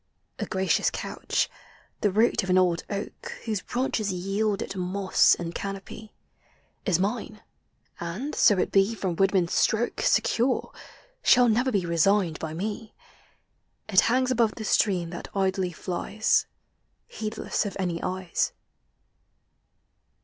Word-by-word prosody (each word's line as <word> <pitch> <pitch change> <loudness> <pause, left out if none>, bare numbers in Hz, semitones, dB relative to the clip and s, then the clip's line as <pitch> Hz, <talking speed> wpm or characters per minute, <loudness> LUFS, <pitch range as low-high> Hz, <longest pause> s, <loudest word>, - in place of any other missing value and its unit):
A - - -3
gracious 190 0 +1
couch— - - -2 0.5
the 205 - +2
root 220 +5 +3
of 190 - -6
an 180 - +4
old 180 -2 +2
oak 200 0 -5
Whose 215 -4 -1
branches 240 -5 -1
yield 195 +3 -1
it - - -7
moss 185 +1 +3
and 170 -1 -5
canopy— 200 +3 -7 0.8
Is 180 -5 +3
mine, 210 +2 -3 0.6
and, 190 - -4
so 205 -4 +5
it - - 0
be 195 +3 +3
from 185 -5 -2
woodman's 190 -2 +2
Btrolffl 225 +2 +1
Secure, 250 +3 +1 0.5
shall 245 -1 +5
never 245 +4 +2
be 195 -5 0
resigned 170 0 +2
bj 160 0 -5
me; 215 +3 -5 0.9
It 195 -4 +5
hangs 255 +1 +2
above 230 -3 +2
the 220 - -6
stream 180 -6 +1
that 175 - -7
idlj 190 -2 0
flies, 200 +5 0 0.6
Heedless 215 - -3
of 200 - -6
any 175 -3 -2
eyes. 185 -1 -1
195 Hz, 130 wpm, -26 LUFS, 185-220 Hz, 0.9 s, so